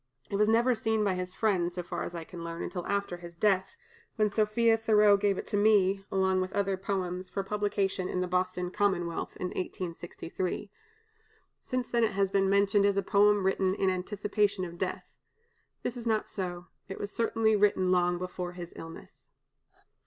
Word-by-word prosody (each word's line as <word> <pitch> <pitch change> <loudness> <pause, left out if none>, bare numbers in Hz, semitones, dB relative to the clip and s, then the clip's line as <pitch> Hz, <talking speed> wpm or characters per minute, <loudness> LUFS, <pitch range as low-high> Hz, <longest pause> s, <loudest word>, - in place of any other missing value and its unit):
It - - -1
was 210 +1 +3
never 235 +3 +4
seen 220 -1 0
by 200 -2 +2
his 180 0 -4
friends, 180 -5 +1
so 180 - -3
far 175 0 -5
as 175 - -5
I 165 - -4
can 170 +1 -9
learn, 170 0 -5
until 180 -2 -4
after 200 -3 -1
his 170 -1 -11
death, 190 0 +1 0.4
when 215 -1 +2
Sophia 225 +2 +3
Thoreau 210 -2 +5
gave 200 -1 +1
it - - -4
to 205 - 0
me, 200 -2 +4
along 190 -1 +2
with 185 0 -3
other 195 -1 +1
poems, 185 -1 -3
for 195 - -3
publication 200 -2 -1
in 180 - -1
the 180 - 0
"Boston 180 0 -1
Commonwealth," 180 -4 -1
in 180 - -2
1863. 180 +2 -5 0.9
Since 255 -1 -3
then 235 -1 +2
it 215 - +1
has 195 0 +1
been 195 -1 +2
mentioned 200 +1 +3
as 200 -1 +1
a 200 - +2
poem 205 0 +4
written 190 0 +1
in 190 -2 +2
anticipation 205 +1 -1
of 170 0 -9
death. 185 - -4 0.6
This 245 - -2
is 240 -1 -6
not 220 -1 +1
so; 175 -2 -5 0.2
it 195 - -6
was 205 - -5
certainly 225 -1 +2
written 195 -3 +3
long 175 -1 +3
before 180 0 -5
his 175 -1 -8
illness. 165 0 -11
195 Hz, 185 wpm, -29 LUFS, 180-210 Hz, 0.9 s, Thoreau